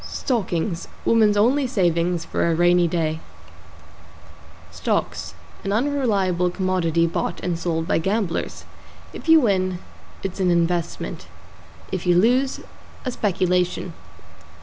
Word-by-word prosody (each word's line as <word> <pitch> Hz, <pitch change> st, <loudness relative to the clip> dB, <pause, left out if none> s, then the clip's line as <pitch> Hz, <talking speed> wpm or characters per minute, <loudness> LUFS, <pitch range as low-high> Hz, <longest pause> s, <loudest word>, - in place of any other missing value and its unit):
=STOCKINGS= 185 Hz, -, -2 dB, 0.2 s
Woman's 215 Hz, -2 st, +4 dB
only 255 Hz, +6 st, +3 dB
savings 175 Hz, -5 st, +1 dB
for -, -, 0 dB
A 165 Hz, -, +2 dB
Rainy 175 Hz, +1 st, +4 dB
Day. 160 Hz, -2 st, -1 dB, 1.5 s
=STOCKS= 80 Hz, -, -2 dB, 0.3 s
An 195 Hz, -, -2 dB
unreliable 205 Hz, -8 st, +1 dB
commodity 175 Hz, -3 st, +1 dB
bought 170 Hz, -, -2 dB
and 175 Hz, -2 st, -2 dB
sold 165 Hz, -1 st, -2 dB
by -, -, +2 dB
gamblers. 190 Hz, 0 st, -2 dB, 0.5 s
If -, -, -7 dB
you 325 Hz, 0 st, +8 dB
win, 185 Hz, -7 st, +1 dB, 0.5 s
it's 195 Hz, 0 st, -4 dB
an 185 Hz, -1 st, +2 dB
investment; 170 Hz, 0 st, -1 dB, 0.6 s
if 185 Hz, -1 st, -3 dB
you 175 Hz, -1 st, +5 dB
lose, 255 Hz, +7 st, +2 dB, 0.4 s
a 255 Hz, -, -1 dB
speculation. 180 Hz, -4 st, 0 dB
180 Hz, 115 wpm, -22 LUFS, 170-210 Hz, 1.5 s, you